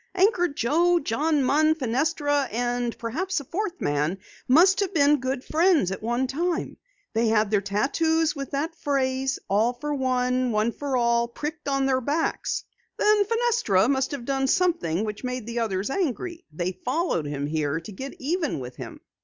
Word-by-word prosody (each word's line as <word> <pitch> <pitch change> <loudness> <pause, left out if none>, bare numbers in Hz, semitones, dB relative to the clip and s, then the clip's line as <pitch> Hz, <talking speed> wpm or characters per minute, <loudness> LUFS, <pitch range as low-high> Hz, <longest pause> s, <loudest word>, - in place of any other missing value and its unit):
Anchor 375 -2 +3
Joe, 335 +6 +2
John 290 +3 0
Munn, 310 +4 +3
Fenestra, 290 +1 0
and 240 +1 -1
perhaps 330 +11 -2
a - - -8
fourth 370 +5 -4
man 150 +5 0 0.3
must 350 +9 +5
have 395 -2 -1
been 290 -1 +4
good 260 0 -3
friends 320 - +3
at 190 - -5
one 240 +4 0
time. 330 +6 -2 0.4
They 230 +1 +2
had 220 -1 +2
their 205 -2 +3
tattoos 305 - +1
with 275 -1 -5
that 300 +4 -2
phrase, 265 -3 -1
All 220 +5 +2
for 295 +4 -4
one, 255 -2 0
one 215 +2 +1
for 275 +1 -2
all, 235 -1 +2
pricked 300 +5 -6
on 275 -1 +1
their 260 -1 +1
backs. 300 +6 -1 0.3
Then 420 -1 +4
Fenestra 455 - +2
must 265 0 +1
have 275 -5 -6
done 270 0 0
something 270 - +1
which 210 +2 -6
made 250 -2 -3
the 235 +1 -3
others 205 0 -1
angry. 340 - -2
They 175 +4 -2
followed 255 - 0
him 145 -1 -3
here 150 0 -1
to 165 +6 -10
get 265 - -7
even 315 - -1
with 125 -1 -8
him." - - -9
265 Hz, 170 wpm, -25 LUFS, 230-320 Hz, 0.4 s, must